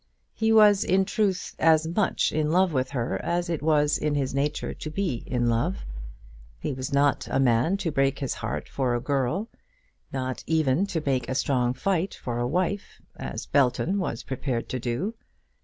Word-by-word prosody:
He 220 0 +1
was, 210 -2 +6
in 190 +1 +2
truth, 195 -3 -1
as 160 0 +4
much 175 +5 +1
in 155 0 0
love 180 0 +3
with 130 -1 0
her 125 -3 -2
as 175 0 -1
it 165 - -2
was 150 -1 +2
in 150 -1 0
his 135 -3 -1
nature 145 +2 -1
to 155 - -7
be 165 -6 -1
in 120 -2 0
love. 115 - 0 0.7
He - - -3
was 130 +3 -5
not 140 0 +2
a - - +1
man 130 +8 +3
to 175 -5 -2
break 135 -1 +1
his 135 - -2
heart 115 +1 -4
for 130 -3 -1
a - - 0
girl; 140 - -1 0.6
nor 130 -1 -2
even 160 +3 +2
to 160 -5 -3
make 130 -4 0
a 130 - -1
strong 125 -2 +1
fight 190 +4 0
for 120 -1 -4
a 120 - 0
wife, 185 +7 -2 0.2
as - - -5
Belton 140 +8 +2
was 145 -11 -3
prepared 130 -2 -3
to 130 - -2
do. 125 - -2
145 Hz, 185 wpm, -26 LUFS, 130-175 Hz, 0.7 s, was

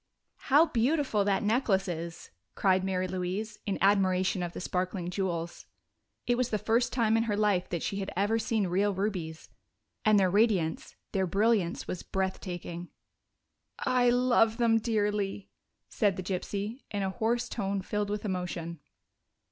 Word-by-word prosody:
"How 290 +5 +7
beautiful 260 -5 +1
that 200 0 +1
necklace 210 -3 +2
is!" 170 -1 -6 0.2
cried 190 -1 +3
Mary 185 -1 -1
Louise, 185 +4 -3
in 200 - 0
admiration 190 -2 +3
of 175 -1 -3
the - - -6
sparkling 180 -1 -2
jewels. 175 -3 -3 0.6
It 245 0 +1
was 250 -1 +1
the 215 - 0
first 230 +4 +1
time 225 -3 +2
in 225 - +1
her 210 -2 -1
life 205 -4 +1
that 170 -2 -3
she 195 - -2
had 195 -1 -3
ever 210 +4 +2
seen 220 -2 0
real 195 +3 +1
rubies, 180 -5 -3 0.5
and 215 -1 +5
their 190 - +4
radiance, 195 -6 +1 0.2
their 190 -1 0
brilliance, 200 -1 +1
was 180 - -4
breath 190 -1 -2
taking. 175 -1 -6 0.9
"I 250 -1 +2
love 240 -2 +3
them 230 -2 +3
dearly," 210 -3 -1 0.4
said 205 -4 +1
the 185 - -4
gypsy, 200 +6 -3
in 205 -2 -2
a 190 - -1
hoarse 235 +3 0
tone, 200 -4 -2
filled 210 +1 -2
with 210 +1 -3
emotion. 180 -3 -3
200 Hz, 155 wpm, -29 LUFS, 185-225 Hz, 0.9 s, How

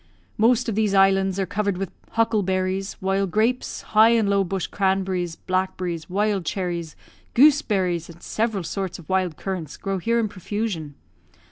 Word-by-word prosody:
"Most 240 +3 +3
of 225 - 0
these 210 -1 +1
islands 195 0 +3
are 195 - +1
covered 200 0 -1
with 195 -1 -4 0.2
huckleberries; 195 -4 0
while 195 +1 +1
grapes, 225 +7 0
high 220 +1 +7
and 230 -3 +3
low 200 0 +3
bush 190 -1 -2
cranberries, 190 -3 -1
blackberries, 185 -3 -2
wild 200 0 0
cherries, 170 -2 -3 0.4
gooseberries, 205 - +3
and 170 +1 -13
several 220 -4 -1
sorts 190 +2 -4
of 170 - -14
wild 185 -4 0
currants 180 -6 -5
grow 195 -1 -3
here 230 +6 +1
in 225 - +1
profusion. 195 -6 -4
195 Hz, 150 wpm, -23 LUFS, 180-215 Hz, 0.4 s, high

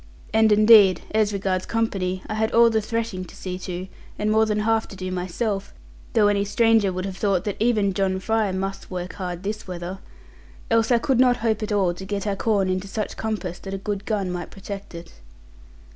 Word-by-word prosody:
And 220 0 +4
indeed, 210 -3 +7
as 215 -1 +2
regards 190 -2 -1
company, 190 -5 -1
I - - -4
had 220 0 0
all 235 0 +6
the 220 -1 +1
threshing 225 -4 -3
to - - -14
see 185 -1 -5
to, 185 0 -5 0.3
and 210 +1 0
more 220 0 +4
than 210 0 0
half 225 +1 +1
to - - -11
do 185 -1 -5
myself 195 +3 -3 0.4
(though 220 -4 +4
any 200 -1 +2
one 210 -2 +3
would 185 +1 -3
have 190 -1 -5
thought 195 -4 +1
that 205 -1 -2
even 215 -4 +2
John 190 0 0
Fry 220 +1 0
must 195 +1 -4
work 180 -1 -5
hard 180 -2 -5
this 210 +1 -4
weather), 180 +1 -6 0.7
else 225 0 +3
I 240 - +5
could 260 +1 +1
not 250 -1 +5
hope 220 -1 +1
at 215 - -3
all 195 -4 +2
to 180 - -9
get 200 +1 -3
our 200 -1 0
corn 200 -1 +1
into 185 +1 -2
such 210 +2 -4
compass 210 -5 -4
that 195 0 -6
a - - -3
good 200 +1 -4
gun 200 -4 -1
might 175 -1 -5
protect 195 -1 -8
it. 170 - -10
200 Hz, 210 wpm, -23 LUFS, 185-220 Hz, 0.7 s, indeed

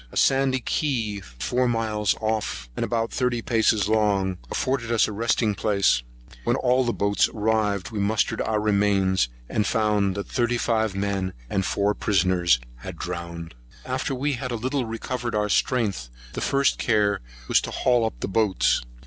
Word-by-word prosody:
A - - -7
sandy 135 -1 +3
key, 115 -8 -1
four 100 - -2
miles 110 -3 0
off, 105 - -2
and - - -2
about 115 -1 -1
thirty 125 -3 -1
paces 110 -3 +2
long, 100 -4 +1
afforded 130 -3 -1
us 115 - +3
a - - -5
resting 110 0 +1
place; 100 - +2 0.3
and - - -19
when - - +1
all 125 +1 +2
the 120 - 0
boats 100 -2 +1
arrived, 105 -2 0
we 110 - -3
mustered 105 +2 +1
our 110 -1 0
remains, 100 - +2 0.2
and 105 - 0
found 105 -4 +1
that 100 - -3
thirty 120 -1 0
five 110 -4 0
men 95 -2 -1 0.2
and 95 -1 0
four 100 +1 +1
prisoners 90 -8 +2 0.2
were - - -5
drowned. 85 -1 -6 0.3
After 130 +1 -2
we 140 +3 -1
had 130 0 -4
a 120 - -2
little 130 +3 -1
recovered 120 +1 -4
our 105 0 0
strength, 100 - 0 0.2
the - - -4
first 140 0 +2
care 105 -3 +2 0.3
was - - +4
to - - -5
haul 125 -2 +2
up 110 - -3
the - - -1
boats. 95 - +2
105 Hz, 170 wpm, -24 LUFS, 100-120 Hz, 0.3 s, was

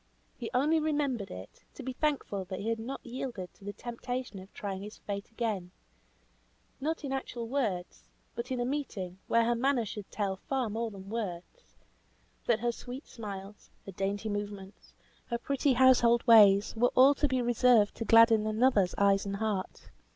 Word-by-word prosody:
He 235 - -6
only 300 +5 +3
remembered 290 -9 -1
it, 95 +2 -10
to - - -8
be 260 +1 -4
thankful 250 -10 -2
he 200 +3 -3
had 230 0 -1
not 250 +5 -6
yielded 235 -7 -6
to - - -21
the 205 - -4
temptation 245 0 -5
of 190 +1 -13
trying 195 -2 -5
his 210 +1 -9
fate 200 -1 -6
again, 220 -6 -3 1.1
not 315 +3 -2
in 275 - -4
actual 250 -3 -4
words, 220 -9 -2 0.3
but 235 +1 -5
in 255 -1 -2
a 240 - 0
meeting, 215 -10 -4
where 230 0 +3
her 240 - +2
manner 245 0 +1
should 210 -1 -7
tell 195 -2 -2
far 255 +1 -2
more 230 +2 -2
than 195 -1 -10
words, 215 - -6 0.7
that 230 -2 +2
her 240 0 +1
sweeter 250 +4 -9
smiles, 200 -2 -8 0.2
her 195 - -7
dainty 200 +3 -2
movements, 205 -2 -6 0.3
her 235 - -1
pretty 275 +2 +1
household 240 -2 +5
ways, 210 -4 +6
were 245 +2 +2
all 265 +3 +7
to 295 +1 +1
be 260 -1 0
reserved 240 -3 +4
to - - -2
gladden 225 -1 +6
another's 215 -4 +2
eyes 200 0 +3
and 200 - -2
heart. 205 -2 -3
230 Hz, 175 wpm, -30 LUFS, 200-255 Hz, 1.1 s, all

